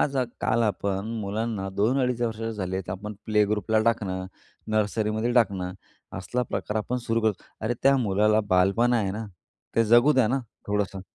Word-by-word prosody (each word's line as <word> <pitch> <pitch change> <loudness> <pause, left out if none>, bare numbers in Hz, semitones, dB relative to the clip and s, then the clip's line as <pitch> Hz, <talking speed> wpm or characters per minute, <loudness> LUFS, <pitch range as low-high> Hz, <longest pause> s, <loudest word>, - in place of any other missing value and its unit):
आज 140 -2 +1
अ, 130 - +2 0.2
काल 115 +1 +2
आपण 100 -1 -1
मुलांना 105 -1 -2
2-2.5 125 +3 +1
वर्षाचे 115 -1 -2
झाले 95 -3 -3
तर 95 - -6
आपण 105 +3 -6
प्ले 105 -1 +3
ग्रुपला 105 +1 +1
टाकणं, 95 -5 0 0.4
नर्सरीमध्ये 110 +2 0
टाकणं, 95 -7 +1 0.5
असला 120 +7 -2
प्रकार 110 -2 -3
आपण 125 +4 -2
सुरू 115 0 +1
करतो. 110 -3 0 0.2
अरे, 110 +2 -1
त्या 135 0 +5
मुलाला 105 -1 +3
बालपण 100 +7 +3
आहे 105 -5 +1
ना, 110 +2 -5 0.5
ते 115 - +5
जगू 120 +6 +6
द्या 130 -6 +3
ना, 135 - +1 0.3
थोडंसं. 100 -2 -1
110 Hz, 165 wpm, -26 LUFS, 100-115 Hz, 0.5 s, जगू